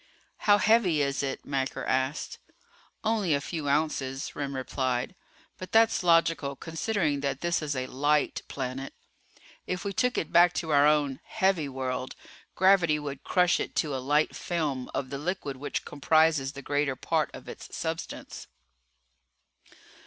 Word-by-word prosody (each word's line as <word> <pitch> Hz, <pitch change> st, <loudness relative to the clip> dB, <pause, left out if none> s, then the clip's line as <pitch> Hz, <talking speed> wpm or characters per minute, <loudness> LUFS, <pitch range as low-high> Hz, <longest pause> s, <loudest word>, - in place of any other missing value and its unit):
"How 205 Hz, -, +8 dB
heavy 205 Hz, -9 st, +3 dB
is 140 Hz, 0 st, -1 dB
it?" 135 Hz, -1 st, -4 dB
Macker 135 Hz, -1 st, -2 dB
asked. 130 Hz, +4 st, -1 dB, 0.6 s
"Only 215 Hz, -8 st, +2 dB
a -, -, 0 dB
few 150 Hz, 0 st, -4 dB
ounces," 140 Hz, -3 st, -1 dB
Remm 140 Hz, -1 st, -3 dB
replied. 130 Hz, +1 st, -2 dB, 0.5 s
"But 185 Hz, -, -8 dB
that's 225 Hz, -1 st, +4 dB
logical 165 Hz, -5 st, +3 dB
considering 165 Hz, -1 st, -1 dB
that 140 Hz, -1 st, -2 dB
this 170 Hz, -1 st, 0 dB
is 145 Hz, -2 st, -2 dB
a 130 Hz, 0 st, -2 dB
'light' 145 Hz, +3 st, +1 dB
planet. 135 Hz, 0 st, -5 dB, 0.7 s
If 180 Hz, 0 st, -3 dB
we 200 Hz, -, -2 dB
took 250 Hz, +4 st, +1 dB
it 160 Hz, -, -2 dB
back 175 Hz, +1 st, +6 dB
to 160 Hz, 0 st, -3 dB
our 145 Hz, 0 st, +6 dB
own 145 Hz, -3 st, +2 dB
'heavy' 185 Hz, -7 st, 0 dB
world, 130 Hz, -1 st, -4 dB, 0.4 s
gravity 185 Hz, -5 st, +4 dB
would 140 Hz, -2 st, -6 dB
crush 180 Hz, -1 st, +3 dB
it -, -, -4 dB
to 150 Hz, -4 st, 0 dB
a 130 Hz, -, -3 dB
light 145 Hz, +4 st, +1 dB
film 150 Hz, -7 st, -2 dB
of 135 Hz, 0 st, -3 dB
the 140 Hz, -, -4 dB
liquid 150 Hz, -4 st, -3 dB
which 145 Hz, -, -4 dB
comprises 150 Hz, -1 st, +2 dB
the 140 Hz, 0 st, -9 dB
greater 145 Hz, -1 st, 0 dB
part -, -, 0 dB
of -, -, -11 dB
its -, -, -9 dB
substance." -, -, -5 dB
145 Hz, 150 wpm, -28 LUFS, 135-170 Hz, 0.7 s, How